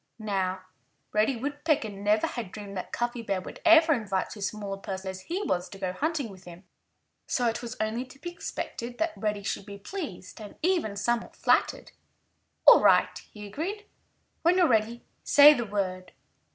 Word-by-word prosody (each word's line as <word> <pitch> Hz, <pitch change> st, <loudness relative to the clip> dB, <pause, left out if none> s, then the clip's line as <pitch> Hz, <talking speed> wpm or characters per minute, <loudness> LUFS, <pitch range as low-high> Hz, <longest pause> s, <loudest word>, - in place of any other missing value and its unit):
Now, 190 Hz, -4 st, -2 dB, 0.5 s
Reddy 215 Hz, +5 st, +2 dB
Woodpecker 290 Hz, 0 st, -1 dB
never 205 Hz, +2 st, +1 dB
had 225 Hz, -7 st, -5 dB
dreamed 205 Hz, -2 st, -8 dB
that 185 Hz, -, -5 dB
Cuffy 240 Hz, 0 st, -2 dB
Bear 200 Hz, -4 st, -1 dB
would 185 Hz, -, -10 dB
ever 325 Hz, -1 st, +7 dB
invite 200 Hz, -7 st, -2 dB
so 215 Hz, -, -9 dB
small 205 Hz, 0 st, -4 dB
a 195 Hz, -, -8 dB
person 190 Hz, -1 st, -5 dB
as 190 Hz, 0 st, -9 dB
he 360 Hz, -, -3 dB
was 180 Hz, -, -1 dB
to 195 Hz, -, -10 dB
go 185 Hz, -2 st, -3 dB
hunting 295 Hz, -, -2 dB
with 185 Hz, -1 st, -14 dB
him. 175 Hz, +1 st, -12 dB, 0.6 s
So 245 Hz, -2 st, +1 dB
it 230 Hz, +1 st, -1 dB
was 235 Hz, -2 st, -6 dB
only 220 Hz, +4 st, -1 dB
to 260 Hz, +1 st, -16 dB
be 345 Hz, +5 st, -6 dB
expected 245 Hz, -7 st, -6 dB
that 325 Hz, 0 st, 0 dB
Reddy 210 Hz, -2 st, -2 dB
should 195 Hz, 0 st, -4 dB
be 200 Hz, -1 st, -8 dB
pleased 205 Hz, -, -7 dB
and 210 Hz, -, -10 dB
even 340 Hz, -, +1 dB
somewhat 235 Hz, +3 st, -1 dB
flattered. -, -, +1 dB, 0.7 s
"All -, -, +9 dB
right!" -, -, +4 dB, 0.2 s
he 210 Hz, -1 st, -9 dB
agreed. 365 Hz, -, -5 dB, 0.6 s
"When 345 Hz, +2 st, +3 dB
you're 355 Hz, -2 st, +5 dB
ready, 230 Hz, 0 st, +1 dB, 0.2 s
say 290 Hz, +1 st, +8 dB
the 240 Hz, -6 st, -3 dB
word." 185 Hz, -2 st, -3 dB
220 Hz, 180 wpm, -28 LUFS, 195-285 Hz, 0.7 s, All